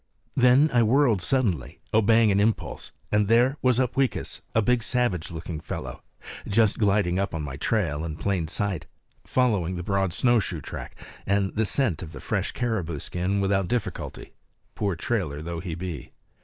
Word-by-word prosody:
Then 130 Hz, +4 st, +5 dB
I 120 Hz, -, +5 dB
whirled 115 Hz, -3 st, +3 dB
suddenly, 95 Hz, -, 0 dB
obeying 110 Hz, 0 st, +5 dB
an 100 Hz, -, +3 dB
impulse; 110 Hz, +2 st, -1 dB, 0.2 s
and 105 Hz, -1 st, +3 dB
there 120 Hz, +5 st, +4 dB
was 125 Hz, -1 st, +3 dB
Upweekis, 130 Hz, +1 st, 0 dB
a -, -, +5 dB
big, 120 Hz, +2 st, +2 dB
savage 115 Hz, -8 st, 0 dB
looking 80 Hz, -1 st, -6 dB
fellow, 80 Hz, -, -6 dB, 0.5 s
just 110 Hz, 0 st, +2 dB
gliding 100 Hz, -4 st, +2 dB
up 100 Hz, -3 st, -1 dB
on 80 Hz, -, -3 dB
my 70 Hz, -2 st, -5 dB
trail 80 Hz, -2 st, 0 dB
in 80 Hz, -2 st, -4 dB
plain 90 Hz, -1 st, -1 dB
sight, 95 Hz, -1 st, -2 dB, 0.4 s
following 105 Hz, -9 st, +1 dB
the 85 Hz, -, -4 dB
broad 95 Hz, 0 st, 0 dB
snowshoe 110 Hz, -5 st, +2 dB
track -, -, -7 dB, 0.3 s
and 100 Hz, -1 st, +1 dB
the 110 Hz, -1 st, 0 dB
scent 105 Hz, -, 0 dB
of 80 Hz, -3 st, -8 dB
the 70 Hz, -, -8 dB
fresh -, -, -2 dB
caribou 100 Hz, -10 st, -2 dB
skin 90 Hz, +6 st, -1 dB
without 95 Hz, -1 st, +1 dB
difficulty, 110 Hz, -5 st, -4 dB, 0.4 s
poor 100 Hz, -4 st, -1 dB
trailer 85 Hz, -7 st, -2 dB
though 85 Hz, +2 st, -5 dB
he 85 Hz, -2 st, -5 dB
be. 85 Hz, -5 st, -6 dB
100 Hz, 165 wpm, -26 LUFS, 85-115 Hz, 0.5 s, Then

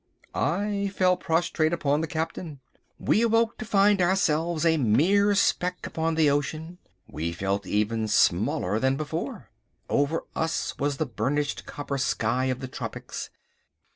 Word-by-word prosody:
I 200 Hz, +4 st, -1 dB
fell 185 Hz, -1 st, +4 dB
prostrate 165 Hz, -1 st, 0 dB
upon 145 Hz, -3 st, +1 dB
the 160 Hz, -, -2 dB
Captain. 160 Hz, -1 st, -4 dB, 0.4 s
We 220 Hz, -, +2 dB
awoke 230 Hz, 0 st, +2 dB
to 225 Hz, -, -5 dB
find 200 Hz, -1 st, +3 dB
ourselves 170 Hz, -3 st, +1 dB
still 165 Hz, -1 st, +4 dB
a -, -, +1 dB
mere 185 Hz, -, +3 dB
speck 180 Hz, -2 st, +1 dB
upon 165 Hz, 0 st, -1 dB
the 160 Hz, -1 st, +4 dB
ocean. 155 Hz, +4 st, -1 dB, 0.3 s
We 80 Hz, +2 st, -3 dB
felt 95 Hz, +3 st, -2 dB
even 110 Hz, +1 st, 0 dB
smaller 105 Hz, -1 st, +2 dB
than 130 Hz, +2 st, +1 dB
before. 160 Hz, -, -5 dB, 0.4 s
Over 145 Hz, +3 st, +1 dB
us 160 Hz, 0 st, -1 dB
was 145 Hz, 0 st, 0 dB
the 155 Hz, -, 0 dB
burnished 140 Hz, +4 st, -2 dB
copper 140 Hz, -1 st, -4 dB
sky 125 Hz, 0 st, 0 dB
of 130 Hz, 0 st, -2 dB
the 130 Hz, -, -4 dB
tropics. -, -, -6 dB
160 Hz, 145 wpm, -26 LUFS, 135-180 Hz, 0.4 s, fell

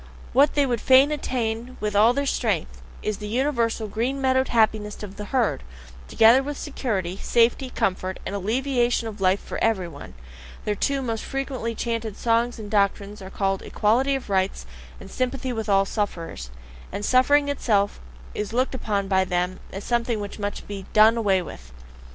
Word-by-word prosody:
What 280 Hz, +2 st, +4 dB
they 285 Hz, -1 st, +4 dB
would 240 Hz, -4 st, -1 dB
fain 265 Hz, +3 st, +6 dB
attain 245 Hz, -4 st, -3 dB
with 210 Hz, -1 st, -2 dB
all 215 Hz, +3 st, +6 dB
their 280 Hz, +3 st, -1 dB
strength, -, -, -1 dB, 0.2 s
is 215 Hz, -1 st, -2 dB
the 210 Hz, -, -6 dB
universal, 235 Hz, -2 st, 0 dB
green 235 Hz, +7 st, -2 dB
meadow 260 Hz, -1 st, +3 dB
happiness 215 Hz, -3 st, +1 dB
of 200 Hz, -1 st, -8 dB
the 210 Hz, -, -6 dB
herd, 240 Hz, -, 0 dB, 0.5 s
together 230 Hz, -, +6 dB
with 285 Hz, +1 st, -5 dB
security, 195 Hz, -, -3 dB
safety, 240 Hz, +3 st, +2 dB
comfort, 185 Hz, -4 st, -2 dB
and -, -, -4 dB
alleviation 240 Hz, +3 st, 0 dB
of 210 Hz, -2 st, -8 dB
life 190 Hz, +1 st, +3 dB
for -, -, -5 dB
every 200 Hz, -6 st, +1 dB
one, 145 Hz, -, -11 dB, 0.5 s
their 210 Hz, -, +1 dB
two 275 Hz, +6 st, -1 dB
most 225 Hz, -3 st, -3 dB
frequently 265 Hz, -4 st, -3 dB
chanted 230 Hz, -2 st, -3 dB
songs 235 Hz, +1 st, +1 dB
and 210 Hz, -2 st, -8 dB
doctrines 200 Hz, 0 st, 0 dB
are 190 Hz, -, -8 dB
called 195 Hz, -1 st, -1 dB
"Equality 250 Hz, +6 st, +1 dB
of 270 Hz, -, -5 dB
Rights" 190 Hz, 0 st, 0 dB, 0.3 s
and -, -, -11 dB
"Sympathy 255 Hz, 0 st, -2 dB
with 220 Hz, -2 st, -4 dB
All 195 Hz, -1 st, +4 dB
Sufferers" 170 Hz, -, -4 dB, 0.4 s
and 205 Hz, -, -4 dB
suffering 285 Hz, +4 st, +4 dB
itself 210 Hz, -8 st, +1 dB, 0.3 s
is 210 Hz, +1 st, -4 dB
looked 255 Hz, +3 st, +1 dB
upon 205 Hz, -6 st, -2 dB
by 190 Hz, -1 st, +3 dB
them 180 Hz, 0 st, -1 dB
as 195 Hz, +1 st, -6 dB
something 235 Hz, -2 st, 0 dB
which 205 Hz, +1 st, -6 dB
must 205 Hz, 0 st, -4 dB
be 200 Hz, -2 st, -7 dB
DONE 215 Hz, +2 st, +6 dB
AWAY 195 Hz, -5 st, +2 dB
WITH. 65 Hz, -, -11 dB
225 Hz, 175 wpm, -24 LUFS, 200-255 Hz, 0.5 s, fain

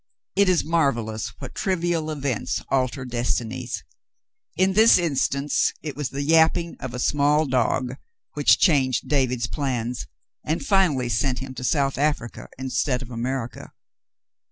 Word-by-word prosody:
It 200 Hz, -1 st, +4 dB
is 180 Hz, -2 st, +3 dB
marvellous 120 Hz, -10 st, 0 dB
what -, -, -8 dB
trivial 175 Hz, -4 st, -1 dB
events 140 Hz, -6 st, -2 dB
alter 130 Hz, 0 st, 0 dB
destinies. 120 Hz, 0 st, -3 dB, 0.7 s
In 190 Hz, +1 st, +3 dB
this 220 Hz, +3 st, +7 dB
instance 140 Hz, -3 st, +1 dB
it 150 Hz, -4 st, -5 dB
was 145 Hz, -2 st, -3 dB
the 140 Hz, +1 st, -4 dB
yapping 165 Hz, +2 st, +3 dB
of 125 Hz, -2 st, -6 dB
a -, -, -4 dB
small 145 Hz, +4 st, +2 dB
dog 130 Hz, 0 st, 0 dB, 0.4 s
which -, -, +4 dB
changed 130 Hz, -, +2 dB
David's 125 Hz, -4 st, +1 dB
plans, 125 Hz, -3 st, -3 dB, 0.4 s
and 160 Hz, -, -2 dB
finally 180 Hz, -, +2 dB
sent 125 Hz, +3 st, 0 dB
him 135 Hz, 0 st, -6 dB
to 125 Hz, -, -7 dB
South 135 Hz, 0 st, +1 dB
Africa 145 Hz, -5 st, -2 dB
instead 130 Hz, 0 st, -1 dB
of 125 Hz, -, -11 dB
America. 120 Hz, +1 st, -4 dB
135 Hz, 135 wpm, -24 LUFS, 125-155 Hz, 0.7 s, this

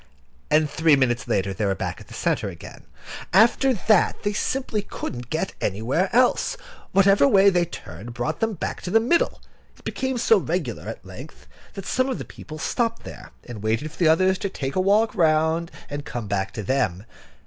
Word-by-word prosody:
And 155 Hz, 0 st, +4 dB
three 160 Hz, +1 st, +3 dB
minutes 120 Hz, -3 st, 0 dB
later 95 Hz, 0 st, 0 dB
they 105 Hz, -, -3 dB
were 100 Hz, -1 st, +1 dB
back -, -, -4 dB
in -, -, -14 dB
the -, -, -11 dB
centre -, -, 0 dB
again. -, -, -11 dB, 0.5 s
After 230 Hz, +7 st, +5 dB
that, 215 Hz, -3 st, +2 dB
they 205 Hz, 0 st, 0 dB
simply 240 Hz, -1 st, -1 dB
couldn't 120 Hz, -, -7 dB
get 165 Hz, +4 st, -2 dB
anywhere 120 Hz, -, 0 dB
else. 250 Hz, -, +2 dB, 0.3 s
Whatever 195 Hz, +6 st, +5 dB
way 200 Hz, -5 st, +6 dB
they 175 Hz, -1 st, +2 dB
turned 105 Hz, -, -9 dB
brought 150 Hz, +6 st, -2 dB
them 225 Hz, -1 st, 0 dB
back -, -, -4 dB
to -, -, -5 dB
the 225 Hz, -, +5 dB
middle. 260 Hz, +10 st, +1 dB, 0.3 s
It -, -, -21 dB
became 260 Hz, -1 st, -2 dB
so 225 Hz, -2 st, +4 dB
regular 160 Hz, -, -3 dB
at -, -, -8 dB
length, -, -, -11 dB, 0.3 s
that 195 Hz, -, -7 dB
some 255 Hz, +1 st, 0 dB
of 260 Hz, -, -2 dB
the -, -, -6 dB
people 155 Hz, -, -10 dB
stopped 230 Hz, +7 st, -1 dB
there, -, -, -10 dB, 0.2 s
and 115 Hz, -4 st, -8 dB
waited 110 Hz, +8 st, -1 dB
for -, -, -16 dB
the 170 Hz, -, +4 dB
others 185 Hz, +4 st, +3 dB
to 200 Hz, -, -2 dB
take 135 Hz, -7 st, -4 dB
a 185 Hz, -, +2 dB
walk 210 Hz, +4 st, +3 dB
round, 160 Hz, 0 st, +2 dB, 0.2 s
and 145 Hz, 0 st, -5 dB
come 120 Hz, -5 st, -5 dB
back 100 Hz, -1 st, -2 dB
to 110 Hz, -, -5 dB
them. 100 Hz, -5 st, -1 dB
165 Hz, 195 wpm, -24 LUFS, -, 0.5 s, way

